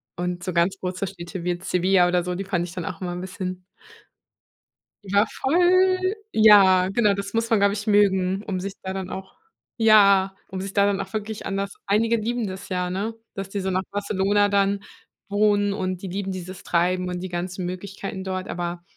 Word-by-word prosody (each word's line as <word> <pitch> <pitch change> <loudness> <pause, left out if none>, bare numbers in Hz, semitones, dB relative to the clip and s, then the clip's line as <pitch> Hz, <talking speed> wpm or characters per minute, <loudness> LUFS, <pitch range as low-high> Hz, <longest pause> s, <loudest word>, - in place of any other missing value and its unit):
und 175 0 -3
so 185 - -3
ganz 175 +3 +2
große 185 +1 -3
Städte 175 -1 -7
wie 180 - -1
jetzt 180 +2 -3
Sevilla 180 0 +3
oder 175 0 +1
so, 180 0 -3
die 195 +1 -4
fand 180 -3 -1
ich 175 - -9
dann 180 0 -5
auch 185 -3 -6
immer 180 - -3
'n 175 - -5
bisschen 185 0 -5 1.4
Ja, 200 +2 +3
voll. 370 +5 +3 0.2
Ja, 195 -4 +6
genau, 205 0 +3
das 200 +1 -5
muss 230 0 0
man, 225 -3 +3
glaube 200 0 +3
ich, 210 +1 -4
mögen, 195 -1 +3
um 190 -4 -3
sich 195 +1 -5
da 190 0 -4
dann 190 -1 -5
auch 190 0 -8 0.4
ja, 200 -4 +5
um 190 -1 -5
sich 195 0 -5
da 200 0 +3
dann 200 -1 +1
auch 190 - -8
wirklich 215 0 -4
an 195 0 -2
das 200 0 -3
einige 225 +3 +2
lieben 230 0 -2
das 190 +1 -8
ja, 180 -1 -1 0.4
dass 195 -1 -6
die 200 - -3
so 190 0 -2
nach 185 +1 0
Barcelona 205 0 +1
dann 200 0 +1 0.5
wohnen 205 0 +2
und 185 -2 -3
die 195 - -5
lieben 195 +1 -3
dieses 185 0 -7
Treiben 180 +1 +1
und 180 0 -3
die 185 - -5
ganzen 180 +1 -4
Möglichkeiten 190 +2 -6
dort, 185 0 -4
aber 175 0 -4
195 Hz, 205 wpm, -24 LUFS, 185-205 Hz, 1.4 s, Ja